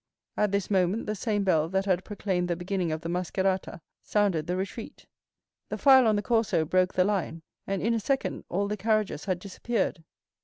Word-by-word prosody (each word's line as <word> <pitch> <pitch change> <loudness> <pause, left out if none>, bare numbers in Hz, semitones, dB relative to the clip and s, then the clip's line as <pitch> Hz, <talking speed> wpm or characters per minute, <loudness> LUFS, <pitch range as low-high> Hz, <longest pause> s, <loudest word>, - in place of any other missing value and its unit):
At 210 -2 +1
this 200 0 -1
moment 190 +3 +1
the 215 - -2
same 210 -1 -1
bell 160 -4 +2
that 190 +1 0
had 185 -2 +1
proclaimed 190 -4 -2
the 175 - 0
beginning 180 -1 -2
of 155 0 -3
the 165 - -5
mascherata 185 +1 -1 0.2
sounded 195 -7 +1
the 180 - -1
retreat. 195 +4 -6 0.6
The - - -3
file 265 -3 +6
on 215 - +3
the 205 - -1
Corso 225 -8 +1
broke 185 +3 +1
the 185 - +4
line, 180 -5 -2 0.2
and 195 -1 -2
in 230 +2 +2
a 230 - +1
second 270 +5 -1
all 200 +3 0
the 210 +1 -3
carriages 215 0 0
had 185 -3 0
disappeared. 195 -1 -2
195 Hz, 195 wpm, -27 LUFS, 180-210 Hz, 0.6 s, file